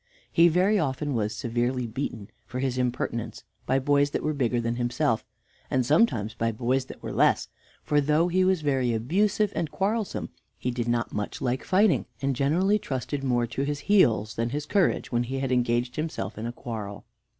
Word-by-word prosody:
He 170 +1 +6
very 185 +5 +3
often 145 0 -1
was 110 -2 -1
severely 120 +1 -1
beaten 115 -3 -5 0.2
for 125 - -6
his 130 -1 -1
impertinence 120 -2 -2 0.2
by 130 - +3
boys 145 +1 +3
that - - -3
were 155 - 0
bigger 125 -4 0
than 115 0 -2
himself, 120 -1 0 0.5
and 130 -1 +1
sometimes 115 - +2
by 115 0 0
boys 125 +4 0
that - - -12
were - - -4
less; - - +3 0.3
for 150 -1 +2
though 150 +4 +3
he 185 +1 +2
was 185 -2 +2
very 130 -5 +1
abusive 200 - +1
and 165 - -1
quarrelsome, 210 +4 -2 0.3
he 125 - -2
did 120 -1 -3
not 120 0 0
much 105 -1 -3
like 130 +1 -1
fighting, 185 - +3
and 135 -1 0
generally 180 +11 +2
trusted 135 - -4
more 120 -2 +1
to 120 +3 -4
his 145 +1 -2
heels 115 - +3
than 115 +1 -1
his 145 +3 -3
courage 195 +1 +1
when 120 -1 +2
he 130 +3 -3
had 135 -1 -2
engaged 120 0 +1
himself 135 -10 -3
in 110 +2 -4
a - - -3
quarrel. 110 -4 -7
130 Hz, 190 wpm, -26 LUFS, 120-150 Hz, 0.5 s, He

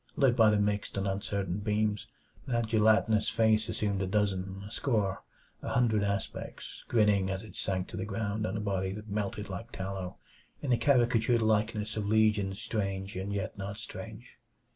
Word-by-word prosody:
Lit 135 -4 +4
by 110 -2 +6
the 105 - +3
mixed 105 0 0
and 100 0 0
uncertain 95 -1 -2
beams, 105 0 0 0.4
that 120 -2 +1
gelatinous 110 0 +3
face 110 -1 +3
assumed 100 -2 -1
a 95 - 0
dozen 95 -1 -1
a 105 - -9
score 105 -7 0 0.4
a - - -4
hundred 115 -3 +2
aspects; 100 -1 -4
grinning, 105 -4 +3
as 95 +1 -3
it 110 - -12
sank 95 -1 -1
to - - -6
the 95 - -2
ground 105 +1 -2
on 110 - -2
a - - -2
body 95 -2 -1
that 105 +1 -8
melted 105 0 -2
like 95 -3 -6
tallow, 95 -1 -5 0.4
in 135 - -2
the 120 - +5
caricatured 120 -3 +3
likeness 110 0 +1
of 105 -2 -1
legions 105 -2 +2
strange 100 -3 -2
and 95 +2 -3
yet 100 -1 -3
not 100 +1 -4
strange. 110 +1 -9
105 Hz, 175 wpm, -30 LUFS, 100-110 Hz, 0.4 s, by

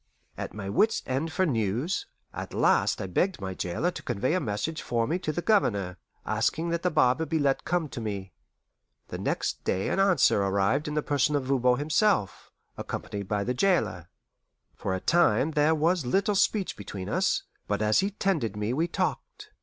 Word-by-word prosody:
At - - -6
my 100 -2 -5
wits' 210 - +2
end 135 +6 -2
for 185 - +1
news, 120 - -1 0.3
at - - -6
last - - +3
I - - -3
begged 180 - 0
my 95 -1 -4
jailer 95 - -1
to - - -8
convey 120 +5 -1
a 185 - +2
message 135 - -3
for 115 -1 0
me 170 +8 -1
to 165 -4 -2
the 175 +3 -3
Governor, 100 - +1 0.3
asking 165 +2 0
that 170 0 -1
the 180 - +1
barber 150 -2 +3
be 160 0 -1
let 140 -3 +1
come 175 -2 0
to 125 - -6
me. 100 -4 -5 0.8
The - - -5
next - - -2
day 95 - -1
an - - 0
answer 185 - +4
arrived 100 +9 +1
in 150 - -3
the 150 - 0
person 145 0 +1
of 145 - 0
Voban 125 -2 +2
himself, 150 - +1 0.3
accompanied 100 -2 -5
by 100 0 0
the 125 - -1
jailer. 110 - +1 0.7
For 95 - -2
a - - -2
time 165 - +3
there 155 +1 +3
was 165 +2 +1
little 195 +11 +1
speech 200 0 +1
between 95 -2 -7
us, - - +1 0.2
but 105 +1 0
as 105 0 +3
he 195 - +1
tended 175 - -1
me 105 +3 -2
we 160 +6 +1
talked. - - -3
140 Hz, 190 wpm, -27 LUFS, 105-170 Hz, 0.8 s, answer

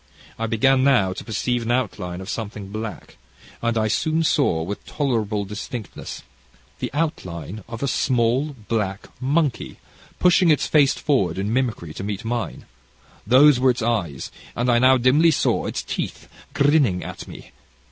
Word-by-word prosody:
I 115 - -1
began 130 +4 +3
now 125 -9 +3
to - - -7
perceive 120 +2 -1
an 115 - -4
outline 95 -7 -2
of 95 - -8
something 105 -3 -5
black, 110 - -7 0.4
and 115 -1 0
I 110 -1 +2
soon 160 +8 +1
saw, 140 - +2
with 100 +5 -5
tolerable 110 -7 -1
distinctness, 105 +2 -7 0.6
the - - -2
outline 100 - -3
of 115 +2 -6
a - - +1
small 130 +3 +1
black 100 -4 -2
monkey, 145 0 0 0.4
pushing 180 0 +4
its 150 - +3
face 145 -3 +4
forward 100 - 0
in 100 +3 -1
mimicry 115 -11 -1
to - - -6
meet 105 +2 -4
mine; 120 0 -3 0.6
those 130 +3 +6
were 130 +1 +4
its 125 -2 0
eyes, 95 - -2 0.2
and 120 +1 +1
I 120 - +4
now 130 +1 +6
dimly 135 +7 +4
saw 155 - +1
its - - -3
teeth - - -5 0.3
grinning 140 - +3
at - - -8
me. - - -11
120 Hz, 155 wpm, -22 LUFS, 105-135 Hz, 0.6 s, those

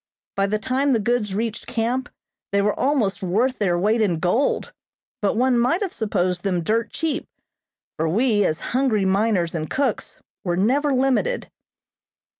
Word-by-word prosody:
By 195 0 +1
the 215 +2 0
time 265 +5 +1
the 230 - +2
goods 215 -3 0
reached 225 +1 -3
camp 245 +3 -1 0.4
they 200 - +2
were 205 +1 +2
almost 250 -8 0
worth 225 +8 0
their 180 -4 +1
weight 215 +5 +2
in 185 -6 +1
gold, 185 - 0 0.5
but 205 +1 +1
one 250 0 +3
might 275 - +2
have 385 - -4
supposed 185 -5 -1
them 180 -4 0
dirt 225 +6 0
cheap, 320 -3 -2 0.7
for 160 +1 0
we, 215 +2 +2
as 155 -3 0
hungry 245 -6 +2
miners 190 -3 +1
and 155 -2 -3
cooks, 265 -6 -2 0.2
were 175 -2 -1
never 275 +9 +2
limited. 270 - 0
220 Hz, 160 wpm, -22 LUFS, 195-255 Hz, 0.7 s, one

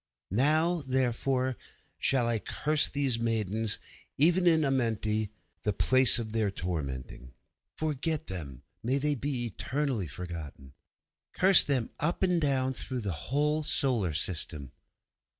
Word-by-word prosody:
'Now, 155 - +2
therefore, 130 -1 -1 0.4
shall 130 -3 +2
I 115 -2 0
curse 150 +7 0
these 135 -5 0
maidens, 110 -2 0 0.4
even 175 +5 +3
in 160 -2 +4
Amenti, 110 -5 -1 0.3
the 105 - -1
place 130 +4 +6
of 115 -2 -4
their 110 -2 0
tormenting. 70 -9 -6 0.4
'Forget 155 +1 -1
them, 70 -8 -7 0.2
may 125 +5 0
they 145 +1 0
be 135 -2 -3
eternally 125 - -3
forgotten. 80 -5 -9 0.6
'Curse 190 0 +6
them 130 -5 +1
up 170 +5 -1
and 180 -2 +2
down 130 -3 +1
through 130 -1 -4
the 100 -3 -2 0.2
whole 150 +3 +1
solar 120 - 0
system.' 75 -4 -2
125 Hz, 125 wpm, -29 LUFS, 100-145 Hz, 0.6 s, place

